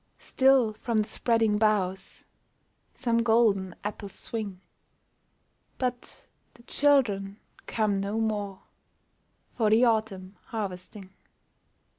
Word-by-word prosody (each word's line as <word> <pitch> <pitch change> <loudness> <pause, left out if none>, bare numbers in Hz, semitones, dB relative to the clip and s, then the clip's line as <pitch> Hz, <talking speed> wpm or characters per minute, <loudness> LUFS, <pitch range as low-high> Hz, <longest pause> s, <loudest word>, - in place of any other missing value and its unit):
Still 260 -4 +3
from 230 +1 -2
the - - -11
spreading 225 -2 +1
boughs 190 -3 0 0.7
Some 235 -3 0
golden 220 -5 +2
apples 205 -1 -6
swing; 210 -5 -5 1.2
But 250 -1 -5 0.3
the 240 - -19
children 225 -9 +2 0.3
come 210 -3 0
no 205 +3 -2
more 205 -3 -2 0.9
For 220 -3 +2
the 225 +4 +5
autumn 205 -4 -1
harvesting. 195 -3 -6
215 Hz, 95 wpm, -27 LUFS, 195-230 Hz, 1.2 s, the